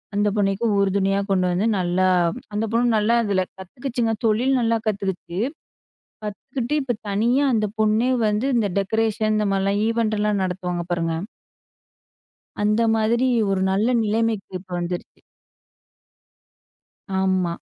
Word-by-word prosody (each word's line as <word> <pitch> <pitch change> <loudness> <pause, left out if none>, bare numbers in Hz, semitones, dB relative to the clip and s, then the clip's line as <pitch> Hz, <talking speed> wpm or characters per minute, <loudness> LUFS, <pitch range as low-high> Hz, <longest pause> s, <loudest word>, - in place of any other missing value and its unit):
அந்த 205 0 +2
பொண்ணுக்கும் 200 +3 +1
உறுதுணையா 195 0 +2
கொண்டு 185 -2 +2
வந்து 180 +4 0
நல்லா 185 0 +1 0.5
அந்த 210 +2 0
பொண்ணு 235 +1 +2
நல்லா 215 +2 +2
அதில 195 -3 +1
கத்துக்கிச்சுங்க, 235 +4 -3
தொழில் 245 +5 +2
நல்லா 230 -1 +2
கத்துக்கிச்சு. 190 -3 -3 0.9
கத்துக்கிட்டு, 245 +6 -4
இப்போ 250 -2 -1
தனியா 235 +8 +2
அந்த 215 -1 +1
பொண்ணே 220 +4 +3 0.2
வந்து 210 +4 0
இந்த 220 -3 +2
டெக்கரேஷன் 215 +2 0
இந்த 210 - +1
மாரிலாம் 195 +1 +1
ஈவெண்ட்லாம் 215 -3 0
நடத்துவாங்க, 180 -1 -3
பாருங்க. 165 -1 0 1.5
அந்த 210 +2 +2
மாதிரி 230 +3 +2 0.2
ஒரு 190 -1 0
நல்ல 205 +4 +1 0.2
நிலைமைக்கு 220 -1 -1
இப்ப 185 - -20
வந்துருச்சு. 175 0 -5 2.0
ஆமா. 185 -2 +1
210 Hz, 120 wpm, -22 LUFS, 190-225 Hz, 2.0 s, பொண்ணே